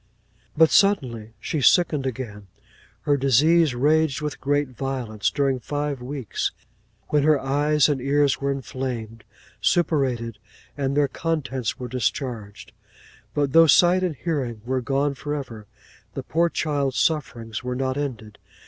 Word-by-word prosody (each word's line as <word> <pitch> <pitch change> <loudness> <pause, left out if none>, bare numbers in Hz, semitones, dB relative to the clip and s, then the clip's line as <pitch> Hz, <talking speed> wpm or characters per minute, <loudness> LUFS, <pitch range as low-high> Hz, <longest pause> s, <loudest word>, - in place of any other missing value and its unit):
'But 160 0 +6
suddenly 125 - +2
she 145 +6 -3
sickened 150 -2 +3
again; 110 -6 -6 0.5
her 145 -2 +1
disease 145 +3 +3
raged 150 +2 +2
with 150 -2 -5
great 145 0 0
violence 125 -5 -2
during 135 -2 0
five 145 0 -3
weeks, 130 -3 -3 0.6
when 150 - +3
her 150 0 +4
eyes 145 +2 +2
and 145 -4 -1
ears 140 +1 +2
were 140 0 0
inflamed, 125 -5 -5 0.4
suppurated, 130 - 0 0.4
and 140 0 -1
their 145 -1 +4
contents 135 -7 -3
were 125 - -6
discharged. 110 -3 -4 0.6
But 145 -2 0
though 165 0 +7
sight 175 +5 +5
and 180 -4 -1
hearing 130 -9 -3
were 130 +1 -1
gone 140 +3 0
for 145 +2 -4
ever, 115 -7 -7 0.5
the - - -4
poor 170 +1 +1
child's 140 -5 -1
sufferings 120 -8 -1
were 125 0 -3
not 130 0 -1
ended. 115 -7 -5
135 Hz, 140 wpm, -23 LUFS, 125-150 Hz, 0.6 s, though